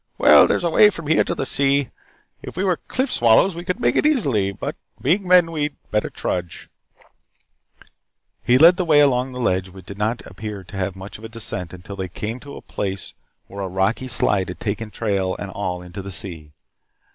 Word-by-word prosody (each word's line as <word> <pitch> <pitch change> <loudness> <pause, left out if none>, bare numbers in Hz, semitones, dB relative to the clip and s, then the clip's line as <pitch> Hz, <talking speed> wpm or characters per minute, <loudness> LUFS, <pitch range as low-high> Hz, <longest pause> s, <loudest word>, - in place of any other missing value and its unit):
Well, - - +7
there's - - 0
a 170 - 0
way 210 +5 +7
from 170 -5 -8
here 160 +2 +3
to - - -3
the - - -2
sea. 140 0 +1 0.5
If - - -9
we 185 - 0
were 185 -3 +1
cliff 260 +1 -1
swallows 120 +11 +4
we 170 - -6
could 180 0 -3
make 120 - +1
it - - +3
easily. 135 - +1
But 100 - -5 0.2
being 185 +7 +1
men 180 -2 +5
we 155 -2 -3
had 145 -1 -5
better 105 - 0
trudge 90 -1 -4 0.9
" - - -29
He 125 - +4
led 170 +5 +7
the 185 - 0
way 155 -4 +4
along 130 -2 +3
the 125 - -7
ledge 95 -5 0
which 95 -1 -13
did 100 +1 -10
not 110 +3 -1
appear 105 0 -7
to 95 - -12
have 95 -1 -2
much 95 +2 -9
of - - -16
a 110 - -7
descent 110 -6 -5
until 90 +2 -10
they 95 -1 -3
came 110 +7 -5
to 140 +2 -11
a - - -11
place 95 -2 -4 0.3
where 100 +1 -8
a 95 - -2
rocky 95 +7 -1
slide 100 -5 +2
had - - -7
taken 110 +1 -3
trail 100 -3 -1
and 100 - -6
all 90 -2 -4
into 90 +3 -8
the 100 - -8
sea. 80 -4 -3
110 Hz, 215 wpm, -21 LUFS, 95-145 Hz, 0.9 s, Well